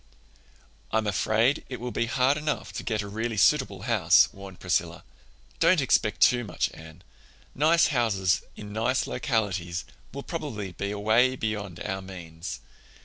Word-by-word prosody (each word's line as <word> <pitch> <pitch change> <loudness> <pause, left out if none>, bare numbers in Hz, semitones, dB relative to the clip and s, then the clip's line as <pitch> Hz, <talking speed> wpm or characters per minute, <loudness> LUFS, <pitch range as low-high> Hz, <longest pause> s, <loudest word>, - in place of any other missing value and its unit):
"I'm 110 0 0
afraid 110 - +1
it 125 - -5
will 125 +1 -4
be 115 - -1
hard 130 +3 +2
enough 150 0 -3
to - - -4
get 110 -3 -1
a - - -7
really 110 +2 -3
suitable 100 -3 +2
house," 110 -8 +4
warned 95 -2 -11
Priscilla. - - -1 0.6
"Don't 170 +1 +5
expect 110 -6 +1
too 120 -1 +5
much, 110 - -2
Anne. 80 -1 -13 0.5
Nice 160 +4 +4
houses 100 -7 +2
in 105 -1 -9
nice 120 +4 +1
localities 100 -7 -2 0.3
will 140 +1 -7
probably 115 - -5
be 100 +3 -4
away 110 +5 +2
beyond 105 -7 -4
our 95 0 -3
means. 90 -2 -8
110 Hz, 145 wpm, -27 LUFS, 95-125 Hz, 0.6 s, Don't